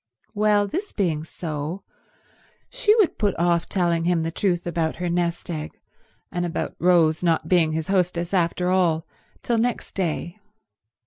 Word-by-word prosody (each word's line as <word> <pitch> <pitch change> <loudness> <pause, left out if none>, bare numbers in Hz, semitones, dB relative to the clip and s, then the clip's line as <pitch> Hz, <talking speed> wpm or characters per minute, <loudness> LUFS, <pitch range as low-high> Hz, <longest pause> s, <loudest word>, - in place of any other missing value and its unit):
Well, 210 0 +3
this 365 - -4
being 165 -7 0
so, 160 +2 -5 0.9
she 445 -4 +3
would 425 -7 +2
put 205 -3 +1
off 170 0 +1
telling 170 -3 +1
him 175 -2 +2
the 165 - -2
truth 175 -1 0
about 170 -2 -1
her 175 0 -2
nest 175 -1 -1
egg, 155 -2 -6 0.5
and 175 - -2
about 175 -2 -3
Rose 170 -3 +4
not 165 -2 +1
being 165 -4 +3
his 160 0 -2
hostess 180 -2 0
after 180 0 +1
all, 170 -4 +2 0.4
till 235 -2 +1
next 245 +1 -1
day. 175 +1 -3
175 Hz, 150 wpm, -24 LUFS, 165-195 Hz, 0.9 s, Rose